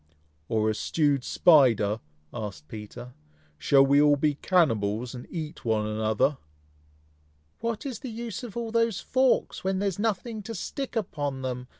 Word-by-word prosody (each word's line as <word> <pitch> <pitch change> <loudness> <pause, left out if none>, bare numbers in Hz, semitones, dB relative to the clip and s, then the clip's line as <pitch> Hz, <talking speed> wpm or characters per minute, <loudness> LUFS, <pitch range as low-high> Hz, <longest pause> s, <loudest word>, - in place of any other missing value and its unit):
"Or 110 -1 +1
a 110 - +2
stewed 145 +3 +1
spider?" 120 - +4 0.3
asked 100 -9 -6
Peter. 110 +5 -9 0.5
"Shall 135 - +5
we 140 +1 +5
all 145 -1 +5
be 150 +1 +1
cannibals, 120 - +1
and 125 -1 -8
eat 160 -3 -6
one 110 -2 +1
another?" 110 +6 0 1.2
"What 230 +1 -3
is 260 -5 -4
the 260 - -6
use 230 0 -5
of 235 -3 -8
all 230 -1 -3
those 230 -3 +1
forks, 260 -1 +1
when 190 0 0
there 200 +1 +1
is 190 - -7
nothing 220 +1 -2
to 225 +3 -7
stick 265 +7 -5
upon 145 - -3
them?" 125 -1 -4
145 Hz, 160 wpm, -27 LUFS, -, 1.2 s, Shall